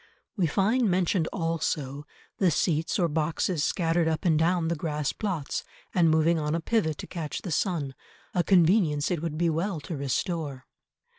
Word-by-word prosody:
We 185 -6 +2
find 215 - +2
mentioned 180 -2 +1
also 155 -5 -2 0.3
the 190 - +4
seats 160 0 +1
or 175 -4 +2
boxes 160 +1 0
scattered 165 -1 +1
up 160 +2 -1
and 160 -3 +4
down 170 0 +2
the 170 - 0
grass 150 -2 -2
plots, 180 -10 -3 0.3
and 170 -3 +4
moving 160 +1 +3
on 150 +1 -1
a - - 0
pivot 165 -4 0
to - - -6
catch 160 -5 -5
the 180 - -4
sun, 150 -5 -1 0.4
a 175 - +2
convenience 170 -5 +3
it 170 -4 -1
would 160 -2 -3
be 170 0 +2
well 170 +2 -1
to 160 - -5
restore. 140 0 -2
165 Hz, 170 wpm, -27 LUFS, 150-180 Hz, 0.4 s, the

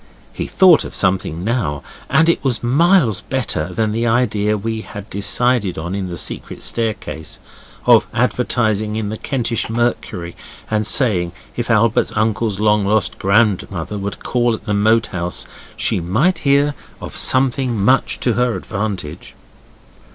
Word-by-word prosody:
He - - -4
thought 185 -4 +5
of - - -8
something 90 -3 0
now, 105 - -1 0.3
and 160 +1 +4
it 170 - +2
was 125 -4 -1
miles 140 - +3
better 100 -11 -3
than 110 +3 -1
the 115 +2 -1
idea 105 -3 +1
we 110 +2 -3
had 100 -1 -9
decided 100 +1 +1
on 85 +4 -4
in 100 -1 -3
the 85 -1 -6
secret - - -3
staircase, 110 -8 -3 0.5
of 115 -3 +5
advertising 110 -3 0
in 110 -2 -2
the 110 - -4
Kentish 120 -4 -2
Mercury 115 -7 -2 0.4
and 105 -1 +1
saying 90 -10 +2 0.2
if 120 -1 -3
Albert's 115 -1 +2
uncle's 110 -1 0
long 105 -1 +3
lost 105 0 0
grandmother 100 -2 +1
would 100 +1 -5
call 120 -2 +1
at - - -13
the 105 - -1
Moat 110 +2 +3
House 90 -1 -3 0.3
she - - 0
might 135 - +1
hear 140 +1 +2 0.3
of - - -8
something 130 -3 +1
much 130 +7 +2
to 120 - +2
her 125 0 +1
advantage. 95 -6 -5
110 Hz, 150 wpm, -18 LUFS, 100-120 Hz, 0.5 s, thought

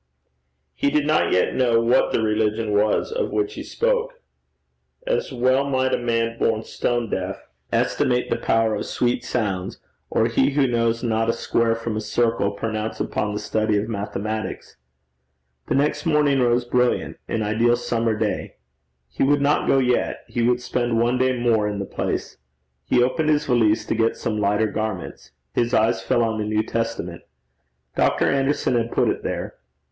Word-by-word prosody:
He 140 - +1
did 150 0 +1
not 155 +1 +2
yet 90 - +2
know 120 -3 +3
what 115 +2 +3
the 110 - +1
religion 110 0 0
was 105 - +1
of 480 +1 -1
which 410 +1 -1
he - - -7
spoke. - - -1 0.9
As - - -1
well 130 +2 +2
might 130 -1 +1
a - - +3
man 115 -1 -1
born 110 -1 +1
stone 120 0 -1
deaf 95 +1 -4 0.2
estimate 125 0 +1
the - - +3
power 115 -1 +1
of 105 - -3
sweet 120 0 0
sounds, 95 -5 -2 0.3
or - - +2
he 140 - +2
who 140 -1 +3
knows 115 -1 0
not 115 -1 0
a - - +3
square 115 -1 +1
from 115 -1 -4
a 110 - -2
circle 110 -1 +1
pronounce 110 +1 -4
upon 105 - -2
the 105 - -3
study 110 -1 0
of 105 +2 -1
mathematics. 110 +1 -4 0.9
The - - 0
next 150 +5 0
morning 150 -3 +3
rose 120 0 +2
brilliant 125 0 0
an 110 - -1
ideal 115 +3 +2
summer 115 -2 -1
day. 105 -1 -2 0.5
He 65 - -7
would 145 +2 +4
not 145 +2 +1
go - - +4
yet; 125 -2 0
he 120 - -2
would 120 +1 +2
spend 120 -2 0
one 120 +2 +1
day 130 0 +2
more 115 -3 +2
in 105 -1 -3
the 100 - -3
place. - - -4 0.5
He 120 - +3
opened 155 +5 0
his 150 -1 +2
valise 115 -4 +2
to - - -1
get 115 0 +1
some 110 -2 -2
lighter 105 +2 +2
garments. 110 -4 -4 0.2
His 120 +1 +1
eye 110 +1 +4
fell 95 +5 0
on 110 -1 -1
a - - -2
New 110 0 0
Testament. 115 -7 -3 0.7
Dr. - - +2
Anderson 135 0 +1
had 115 -1 0
put - - +2
it - - -1
there. - - -4
115 Hz, 175 wpm, -22 LUFS, 110-125 Hz, 0.9 s, would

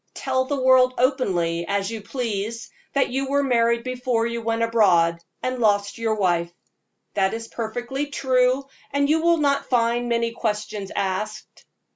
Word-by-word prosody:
Tell 260 -1 0
the 280 +1 -2
world 255 0 +5
openly, 180 - +1
as 200 +1 -1
you 225 -1 -5
please, 230 0 -4 0.2
that 275 - +2
you 265 +2 -2
were 280 0 +2
married 235 -2 +2
before 250 -2 -1
you 235 0 -3
went 230 0 0
abroad, 180 -8 +3 0.2
and 255 0 -2
lost 205 -2 +1
your 225 -1 0
wife. 175 -4 +1 0.6
That 195 +1 +1
is 230 0 -6
perfectly 245 +6 -4
true, 260 -1 +1 0.3
and 280 0 +1
you 315 +2 +2
will 340 0 +4
not 280 -2 +1
find 240 0 +1
many 230 0 +1
questions 210 -3 -3
asked. 200 +3 -4
235 Hz, 155 wpm, -23 LUFS, 210-260 Hz, 0.6 s, world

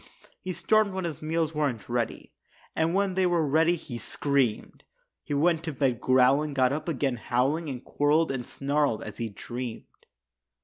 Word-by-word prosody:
He 185 - -4
stormed 215 +1 +2
when 190 -1 -3
his 160 -5 -5
meals 160 0 -1
weren't 140 -8 -1
ready, 120 -2 -3 0.4
And 160 +2 +1
when 195 -1 +1
they 185 0 +2
were 170 -3 +2
ready, 160 +4 +3
he 130 -7 -7
screamed. 135 -6 -1 0.4
He 145 - -3
went 165 +2 +2
to 160 - -3
bed 130 -3 0
growling, 135 +3 +3
got 130 0 +3
up 155 +2 -4
again 135 -4 -1
howling 135 +8 0
And 130 -2 -6
quarreled 150 +2 +2
and 125 -3 -4
snarled 140 -4 0
as - - -9
he 115 -1 -2
dreamed. 120 +3 -8
145 Hz, 170 wpm, -27 LUFS, 130-165 Hz, 0.4 s, ready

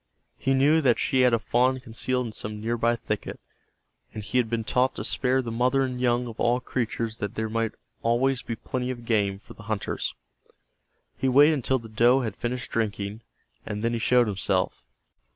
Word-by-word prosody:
He 135 0 +1
knew 150 +4 +4
that 125 -5 +3
she 130 - +2
had 125 -1 +5
a 115 - +4
fawn 125 +4 +1
concealed 125 +1 -2
in 115 - -5
some 105 0 -6
nearby 115 +1 +1
thicket, 105 -3 -4 0.8
and 110 - -5
he 125 +5 0
had 115 -3 0
been 115 -1 -1
taught 125 +3 +1
to - - -4
spare 130 0 +1
the 115 - -4
mother 125 +4 +2
and 125 -1 -3
young 120 0 +2
of 115 -1 -9
all 120 +1 +2
creatures 115 -2 -3
that 100 -1 -4
there 110 0 -2
might 115 0 -1 0.3
always 125 +3 +2
be 115 - -4
plenty 125 +3 -4
of 120 -2 -5
game 100 -4 +1
for 100 - -14
the - - -14
hunters. 110 -2 -2 1.0
He 135 - +2
waited 145 +5 +6
until 130 -2 +1
the 115 -2 -9
doe 120 +4 +4
had 110 -5 -3
finished 125 +1 -4
drinking, 105 -1 -2 0.4
and 105 +1 -5
then 115 0 +1
he 115 - -1
showed 125 +2 +4
himself. 100 -3 -1
120 Hz, 195 wpm, -26 LUFS, 110-125 Hz, 1.0 s, waited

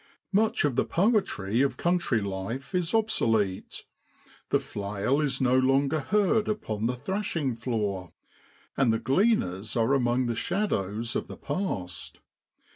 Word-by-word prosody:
Much 215 -2 +2
of 140 -4 0
the - - +3
poetry 165 - +1
of 140 - +1
country 170 -10 +1
life 100 - -5
is 180 -2 0
obsolete; 115 - 0 0.6
the - - +3
flail 105 +6 -2
is 145 -3 0
no 130 -1 +3
longer 135 +4 +3
heard 210 +6 +2
upon 110 - -2
the 125 - -1
thrashing 155 - -2
floor, 105 -7 -2 0.6
and 135 -4 +3
the 110 - +2
gleaners 115 - +1
are 115 +4 +3
among 125 -1 +2
the 120 - 0
shadows 115 - -1
of - - -2
the - - -9
past. 90 - -4
130 Hz, 135 wpm, -27 LUFS, 110-180 Hz, 0.6 s, the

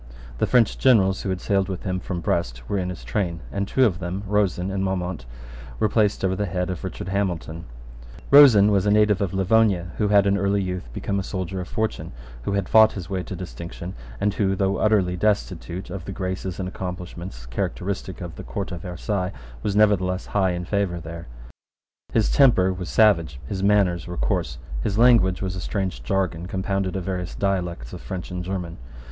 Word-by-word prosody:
The - - +2
French 120 -4 +3
generals 100 -7 +4
who 100 - -3
had 95 -1 -1
sailed 95 0 0
with 95 -2 -5
him 95 -1 -1
from 90 -2 -4
Brest - - -2
were 100 - 0
in 90 -1 -2
his 90 -9 -7
train; 85 +7 -2
and 100 0 -2
two 130 +4 +3
of 90 -7 +1
them, 90 +2 -4
Rosen 95 -2 0
and 95 0 -1
Maumont, 90 -7 -2 0.5
were 110 - +2
placed 105 -2 +2
over 95 0 +1
the 105 +1 -1
head 90 +1 -2
of 90 - -6
Richard 95 0 -5
Hamilton, 85 -4 -2 0.7
Rosen 120 -8 +8
was 100 0 +2
a - - +4
native 105 -1 +4
of 100 -3 0
Livonia, 95 -2 +2
who 105 - +2
had 100 -1 +5
in 100 0 +2
early 100 +1 +1
youth 90 -9 -4
become 100 +10 -2
a - - -2
soldier 95 0 -4
of 90 - -7
fortune, 110 - -3 0.3
who 100 - -2
had 100 -2 0
fought 110 0 +6
his 95 -2 -7
way 95 -1 -1
to 95 - -6
distinction, 90 0 -7 0.3
and 105 - +1
who, 95 -2 +1
though 95 0 +1
utterly 100 -5 +2
destitute 95 -2 -1
of 90 -3 -6
the - - -5
graces 95 -1 -4
and 95 - -2
accomplishments 90 -6 -7
characteristic 95 +10 -4
of 85 -2 -7
the - - -7
Court 100 -1 -5
of 85 -2 -5
Versailles, 90 +1 -3 0.3
was 100 - -1
nevertheless 95 -3 +3
high 95 -2 +3
in 90 0 -4
favour 95 -3 -1
there. 85 -1 -8 0.8
His 110 -2 +2
temper 115 -10 +5
was 90 -1 -6
savage: 85 -11 +3
his 95 +7 -4
manners 100 -4 +2
were 90 - -6
coarse: - - -1 0.2
his 100 - -1
language 115 -6 +5
was 95 -1 -2
a 90 - -5
strange 95 - -3
jargon 90 +4 -1
compounded 95 0 -2
of 95 - -2
various 90 -1 -4
dialects 90 -10 -2
of - - -7
French 90 -1 -6
and 90 0 -4
German. 90 -2 -4
95 Hz, 200 wpm, -24 LUFS, 90-100 Hz, 0.8 s, Rosen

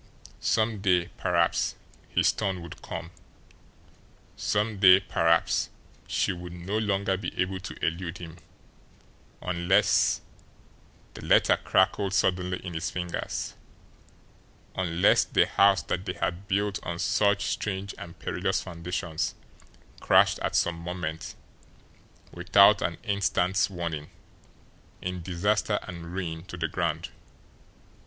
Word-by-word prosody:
Some 110 -2 +1
day, 90 -3 +2
perhaps, - - +1 0.3
his - - +3
turn 95 -4 -3
would 85 - -10
come; - - -6 1.2
some 105 0 -1
day, 95 -1 +8
perhaps, 85 -3 +1 0.4
she - - +1
would 90 0 -8
no 90 +5 -3
longer 100 -2 0
be 95 - -6
able 95 +1 0
to 100 - -7
elude 85 +1 -2
him, 85 -1 -9 1.1
unless 90 +3 +2 0.9
the - - -10
letter - - +4
crackled 95 +1 +1
suddenly 90 0 +1
in 90 - -5
his 80 - -2
fingers 90 -1 -4 1.2
unless 90 -1 +3
the - - +3
house 100 -1 +4
that 90 - -2
they - - -1
had 90 +3 -3
built 100 0 0
on 85 0 -4
such 100 +2 +2
strange 100 -1 -3
and 85 - -9
perilous - - -1
foundations 85 -1 -3 0.6
crashed - - +4
at - - -2
some 85 -1 +1
moment, 85 -2 -5 1.0
without 100 +3 +5
an 80 +1 -1
instant's 100 -2 +1
warning, 85 -5 -4 0.9
in 90 -1 -4
disaster 100 +4 0
and 85 -2 -8
ruin 80 -4 -4
to 90 - -8
the 85 - -1
ground. - - -2
90 Hz, 120 wpm, -27 LUFS, 85-100 Hz, 1.2 s, day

